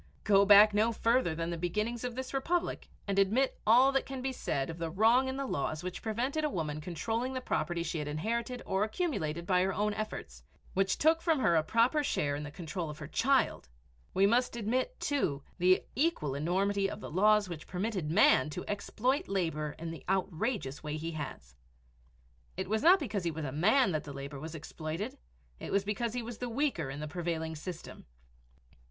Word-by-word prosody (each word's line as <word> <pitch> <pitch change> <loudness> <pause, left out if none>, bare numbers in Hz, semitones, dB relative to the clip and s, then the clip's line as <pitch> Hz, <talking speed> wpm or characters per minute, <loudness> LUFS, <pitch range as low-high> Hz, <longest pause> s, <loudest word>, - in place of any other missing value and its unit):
Go 200 -1 +5
back 205 +1 +8
no 215 +3 +3
further 230 -6 +1
than 165 +1 -3
the 170 - -4
beginnings 210 +7 -2
of 245 -1 -3
this 260 +1 -5
Republic 335 +6 -1 0.2
and 200 0 +1
admit 225 +8 +2
all 250 +5 +7
that 270 -1 0
can 270 -1 -5
be 265 +1 -2
said 140 - -2
of 165 - -9
the 165 -1 -2
wrong 225 +9 +4
in 260 0 -3
the 275 - -2
laws 155 - -2
which 180 0 -5
prevented 250 +8 -1
a 300 - +1
woman 155 - -3
controlling 225 +10 -2
the 260 - -2
property 175 -8 -1
she 170 - -3
had 150 - -3
inherited 235 - -2
or 190 +1 +1
accumulated 210 - -2
by 180 -1 +3
her 190 +1 +1
own 210 +1 +1
efforts, 205 - -6 0.3
which 195 0 +1
took 320 +2 +3
from 325 -2 +2
her 175 -10 +3
a 160 - +5
proper 235 - +2
share 145 - 0
in 145 - -4
the 150 - -6
control 165 +2 -5
of 150 - -7
her 155 - -7
child, 260 - +1 0.4
we 190 +1 +3
must 235 +4 +2
admit, 250 - -1
too, 155 - -1 0.2
the 185 +1 +4
equal 265 - +1
enormity 195 +7 0
of 210 - -6
the - - -8
laws 210 +3 +4
which 170 -3 -8
permitted 185 -4 -2
man 155 -6 +5
to 180 +4 -6
exploit 250 - -1
labor 160 -6 -2
in 165 0 -5
the 165 - -9
outrageous 190 - -1
way 150 0 -4
he 165 +2 -4
has. 135 - -7 1.0
It 190 0 -3
was 215 +2 0
not 365 +6 +7
because 210 - -3
he 170 - 0
was 160 -1 -4
a 135 - -3
man 195 - +3
that 155 -3 -2
the 145 - -7
labor 140 +1 -7
was 160 +3 -7
exploited 160 +4 -5 0.4
it - - -6
was 200 0 +2
because 215 +3 -2
he 245 - -2
was 230 -1 -7
the 245 - -3
weaker 235 - -1
in 140 +2 -6
the 155 - -4
prevailing 160 0 -3
system. 170 +2 -8
195 Hz, 205 wpm, -31 LUFS, 160-240 Hz, 1.0 s, back